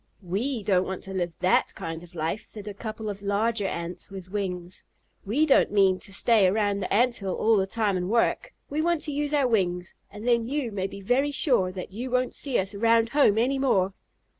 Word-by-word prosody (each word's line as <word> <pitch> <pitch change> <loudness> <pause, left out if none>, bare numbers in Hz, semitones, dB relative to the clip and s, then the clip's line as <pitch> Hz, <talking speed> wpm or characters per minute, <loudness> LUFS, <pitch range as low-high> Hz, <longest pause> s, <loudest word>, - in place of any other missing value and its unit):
"We 215 +7 -2
don't 190 -2 +2
want 190 -1 -5
to 190 - -7
live 175 -2 -1
that 185 0 +2
kind 165 0 -5
of 175 0 -15
life," 165 +6 -2
said 210 -1 -8
a 205 - -4
couple 215 +1 -6
of 200 -1 -5
larger 205 +1 0
Ants 170 0 -5
with 190 -2 -9
wings. 180 -3 -4 0.4
"We 275 +10 +2
don't 275 - +4
mean 195 -2 +3
to 200 - -6
stay 205 0 +4
around 205 +1 +1
the 185 - -4
Ant 240 +4 +3
hill 195 -2 -3
all 225 +1 +3
the 190 -2 +1
time 210 -1 0
and 180 +1 -3
work. 235 - +1 0.2
We 295 +2 -2
want 340 -1 +1
to 305 - -3
use 290 0 -1
our 285 -3 +3
wings, 180 -6 0 0.2
and 210 +3 -8
then 235 -1 +2
you 275 -3 -2
may 195 -2 -2
be 200 0 -10
very 250 +8 +2
sure 250 - +2
that 185 0 -7
you 240 +6 -5
won't 250 0 0
see 270 -4 0
us 195 +2 -1
around 230 +2 +3
home 255 -6 +4
any 265 +4 +1
more." 195 -8 +2
205 Hz, 220 wpm, -26 LUFS, 190-245 Hz, 0.4 s, don't